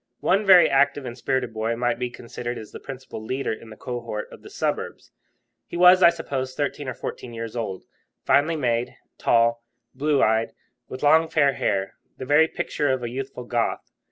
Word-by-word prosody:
One 195 Hz, +3 st, +2 dB
very 185 Hz, -2 st, +8 dB
active 140 Hz, 0 st, +2 dB
and 120 Hz, -1 st, -6 dB
spirited 130 Hz, -1 st, -2 dB
boy 110 Hz, +1 st, -1 dB
might 120 Hz, 0 st, -1 dB
be 125 Hz, -1 st, -2 dB
considered 120 Hz, 0 st, -6 dB
as 110 Hz, -, -9 dB
the -, -, -9 dB
principal 130 Hz, -4 st, -8 dB
leader 130 Hz, +2 st, -2 dB
in 110 Hz, +1 st, -10 dB
the 110 Hz, -, -12 dB
cohort 120 Hz, -4 st, -5 dB
of -, -, -13 dB
the -, -, -12 dB
suburbs. -, -, -3 dB, 0.6 s
He -, -, -6 dB
was, 180 Hz, +1 st, +7 dB
I 170 Hz, -, +9 dB
suppose, 130 Hz, -6 st, -4 dB
thirteen 145 Hz, 0 st, -3 dB
or 125 Hz, -, -5 dB
fourteen 120 Hz, -2 st, -7 dB
years 115 Hz, 0 st, -6 dB
old, 100 Hz, -6 st, -4 dB, 0.4 s
finely 155 Hz, +4 st, +3 dB
made, 120 Hz, -5 st, -1 dB, 0.2 s
tall, 115 Hz, 0 st, +2 dB, 0.3 s
blue 145 Hz, +1 st, +1 dB
eyed, 110 Hz, +1 st, +1 dB, 0.4 s
with 130 Hz, -, -7 dB
long 160 Hz, +2 st, +5 dB
fair 140 Hz, -3 st, +3 dB
hair, 95 Hz, -5 st, -1 dB, 0.2 s
the 130 Hz, -, -6 dB
very 150 Hz, +4 st, +5 dB
picture 155 Hz, -4 st, -2 dB
of 130 Hz, -2 st, -1 dB
a 120 Hz, -, -3 dB
youthful 130 Hz, 0 st, -6 dB
Goth. 120 Hz, -1 st, -2 dB
130 Hz, 185 wpm, -24 LUFS, 115-145 Hz, 0.6 s, I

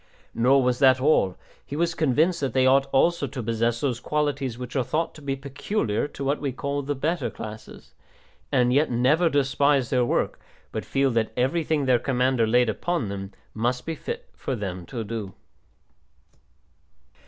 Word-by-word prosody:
Nor 130 Hz, +3 st, +4 dB
was 125 Hz, 0 st, +1 dB
that 130 Hz, -2 st, +5 dB
all; 130 Hz, -10 st, +2 dB, 0.3 s
he 145 Hz, -, -7 dB
was 170 Hz, +2 st, +1 dB
convinced 160 Hz, +4 st, +2 dB
that 135 Hz, -4 st, -1 dB
they 130 Hz, -1 st, +3 dB
ought 135 Hz, +1 st, +4 dB
also 145 Hz, +2 st, +2 dB
to 130 Hz, -4 st, -6 dB
possess 115 Hz, +1 st, 0 dB
those 125 Hz, -5 st, -1 dB
qualities 140 Hz, -4 st, -1 dB
which 125 Hz, +1 st, -7 dB
are 130 Hz, -, +2 dB
thought 160 Hz, +7 st, -1 dB
to 155 Hz, -, -13 dB
be 140 Hz, -1 st, -2 dB
peculiar 135 Hz, -, -2 dB
to 140 Hz, -, -8 dB
what 140 Hz, +2 st, 0 dB
we 140 Hz, -2 st, -1 dB
call 140 Hz, +2 st, -3 dB
"the 145 Hz, +1 st, -3 dB
better 165 Hz, +6 st, -1 dB
classes," 110 Hz, 0 st, -10 dB, 0.6 s
and 125 Hz, -2 st, +3 dB
yet 145 Hz, +4 st, +3 dB
never 135 Hz, +8 st, +3 dB
despise 140 Hz, -2 st, +2 dB
their 125 Hz, -1 st, +3 dB
work, 120 Hz, -, 0 dB, 0.3 s
but -, -, -4 dB
feel 135 Hz, -1 st, +1 dB
that 115 Hz, -2 st, 0 dB
everything 145 Hz, +3 st, +1 dB
their 125 Hz, -2 st, +4 dB
commander 125 Hz, -3 st, +1 dB
laid 120 Hz, +2 st, +3 dB
upon 145 Hz, -, -1 dB
them 95 Hz, 0 st, -6 dB, 0.2 s
must 120 Hz, +3 st, -1 dB
be 165 Hz, -, -2 dB
fit 470 Hz, -, -6 dB
for 135 Hz, -, -4 dB
them 90 Hz, -5 st, -5 dB
to 115 Hz, +2 st, -4 dB
do. 105 Hz, -3 st, -5 dB
130 Hz, 175 wpm, -25 LUFS, 120-145 Hz, 0.6 s, that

